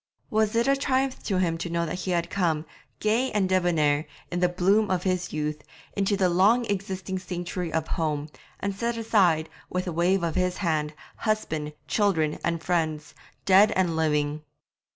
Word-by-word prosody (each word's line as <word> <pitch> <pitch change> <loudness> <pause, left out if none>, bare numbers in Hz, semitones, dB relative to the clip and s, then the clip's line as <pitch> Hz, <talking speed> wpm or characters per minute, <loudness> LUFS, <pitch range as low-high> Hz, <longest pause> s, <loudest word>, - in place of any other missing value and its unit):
Was 220 0 +2
it 235 +2 +2
a 275 - +4
triumph 270 -1 0
to 195 - 0
him 170 -3 0
to 175 - -3
know 170 0 0
that 155 - -4
he 185 - -4
had 170 -1 0
come, 165 -5 0 0.3
gay 230 +5 +1
and 205 -2 +2
debonair, 165 -5 +2 0.2
in 175 - -1
the 180 0 +3
bloom 195 +4 +2
of 185 -1 0
his 185 -1 -1
youth, 150 0 -3 0.3
into 200 0 +1
this 190 -2 +3
long 200 +8 +4
existing 190 -2 -3
sanctuary 180 -1 -4
of 160 0 -1
home, 150 -2 -1 0.3
and 200 0 -2
set 235 +4 -2
aside, 185 -8 +3 0.2
with 180 0 -2
a 180 - -3
wave 175 +3 +2
of 165 -2 0
his 180 +1 0
hand, 155 -4 -1 0.2
husband, 160 -9 -2
children, 165 -8 +1
and 170 -1 -1
friends, 160 -4 -1 0.3
dead 195 +2 +6
and 180 -3 +1
living? 150 -1 0
180 Hz, 175 wpm, -26 LUFS, 160-200 Hz, 0.3 s, dead